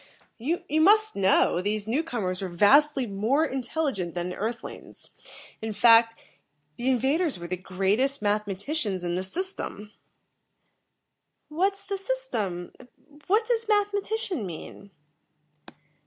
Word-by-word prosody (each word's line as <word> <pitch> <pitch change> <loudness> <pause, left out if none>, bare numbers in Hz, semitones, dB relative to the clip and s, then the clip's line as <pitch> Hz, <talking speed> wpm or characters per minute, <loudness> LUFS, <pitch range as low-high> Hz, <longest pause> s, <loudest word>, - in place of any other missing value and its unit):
"You 315 +9 -2 0.2
must 430 +5 +5
know, 190 -2 +3
these 205 +1 -2
newcomers 230 - -2
were 190 - -3
vastly 270 - +4
more 225 +9 +1
intelligent 255 - -2
than 175 0 -2
the 180 - -5
Earth 230 +3 -3
lings. - - -10 0.5
In 220 -1 -3
fact, 230 +2 +6 0.6
the 245 - -3
invaders 270 - +1
were 170 - -8
the 180 +2 -2
greatest 195 +9 0
mathematicians 205 - -2
in 175 0 -2
the 180 - -1
System." 210 - -4 1.6
"What's 390 +6 0
the 395 0 -4
System? 380 - -3
And 255 - -14 0.4
what 430 +4 +3
does 460 -2 0
mathematician 410 - 0
mean?" 185 +2 -8
235 Hz, 120 wpm, -26 LUFS, -, 1.6 s, fact